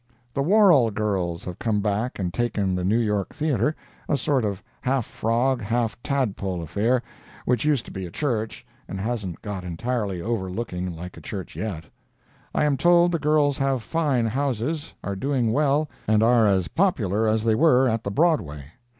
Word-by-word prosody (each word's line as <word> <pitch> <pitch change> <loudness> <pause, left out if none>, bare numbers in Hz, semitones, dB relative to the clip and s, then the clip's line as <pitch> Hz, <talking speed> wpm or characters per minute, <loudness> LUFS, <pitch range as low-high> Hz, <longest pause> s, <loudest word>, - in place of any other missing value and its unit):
The 140 - 0
Worrell 170 - +5
girls 100 -5 -2
have 90 -1 -6
come 110 -3 0
back 105 +4 -1
and 90 -3 -2
taken 105 -6 0
the 90 0 -1
New 100 +5 +2
York 105 -4 -1
Theatre, 150 -2 +1 0.3
a 145 - +2
sort 135 -1 +1
of 100 -3 -3 0.2
half 130 -2 0
frog, 120 +3 0
half 115 +1 0
tadpole 100 -10 -1
affair, 115 +9 +1 0.4
which 125 +1 +1
used 145 -5 +2
to - - -10
be 95 -2 -5
a - - -9
church, 115 - -2 0.2
and 95 - -5
hasn't 105 -5 -3
got 100 -4 -4
entirely 100 +2 -2
over 100 -1 -2
looking 90 -3 -4
like 90 +2 -8
a - - -10
church 95 -5 -6
yet. 95 -8 -4 0.7
I - - +3
am 145 -2 +2
told 175 +1 +5
the 170 - 0
girls 150 -2 +2
have 135 -3 0
fine 145 -7 +1
houses, 140 +5 -1
are 100 +1 -3
doing 125 +1 0
well, 145 +3 +2 0.2
and 110 0 +4
are 115 -1 +5
as 95 -4 +2
popular 110 - +1
as 110 0 +1
they 115 -1 +3
were 130 +1 +4
at 115 -1 0
the - - -2
Broadway. 100 - +1
115 Hz, 180 wpm, -24 LUFS, 100-135 Hz, 0.7 s, Worrell